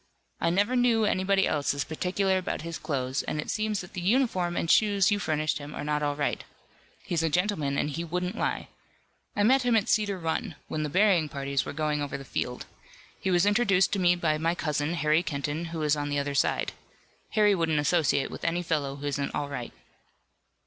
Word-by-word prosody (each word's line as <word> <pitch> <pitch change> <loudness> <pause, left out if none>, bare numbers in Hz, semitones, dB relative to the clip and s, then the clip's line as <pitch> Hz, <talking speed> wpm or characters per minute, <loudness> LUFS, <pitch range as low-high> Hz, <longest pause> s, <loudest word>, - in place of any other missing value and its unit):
I - - +1
never 205 +8 +2
knew 240 -3 +3
anybody 195 -1 +2
else 145 -2 0
as 140 - -1
particular 185 +4 0
about 180 - -4
his 170 -1 -5
clothes, 135 -4 -2
and 150 - -3
it 150 - -3
seems 215 -1 -1
that 180 - -12
the 185 - -4
uniform 185 -4 +1
and - - 0
shoes 200 +1 +4
you 205 - +2
furnished 155 -4 -1
him 145 +1 -8
are - - -4
not 150 0 -1
all 145 -1 0
right. 145 0 -1 0.6
He's 170 -2 0
a 165 - +1
gentleman 165 -5 0
and - - +1
he 155 +3 -3
wouldn't 180 +4 -3
lie. - - -2 0.7
I 205 - +2
met 260 +5 +5
him 245 -2 +2
at 215 -2 +2
Cedar 205 -2 +2
Run, 165 +2 -2
when 155 - -3
the 150 - -2
burying 185 -2 +3
parties 140 -1 -2
were - - -4
going 150 0 -1
over 140 -1 -3
the 135 - -10
field. 125 -1 -3 0.5
He 190 - -2
was 175 0 +3
introduced 205 -3 +3
to 200 - +1
me 175 -1 +4
by 155 -3 0
my 165 +2 +1
cousin, 150 0 -1
Harry 155 +1 +2
Kenton, 150 0 -3
who 165 -1 -4
is 150 0 +3
on 145 0 -3
the 145 - -1
other 140 0 -1
side. 140 - +1 0.6
Harry 210 -1 +4
wouldn't 165 -4 +1
associate 145 -3 +2
with - - -8
any 170 +1 0
fellow 140 -4 -1
who 140 +1 -8
isn't 140 -1 -2
all 145 -1 -2
right." 125 -4 -5
165 Hz, 210 wpm, -27 LUFS, 145-195 Hz, 0.7 s, met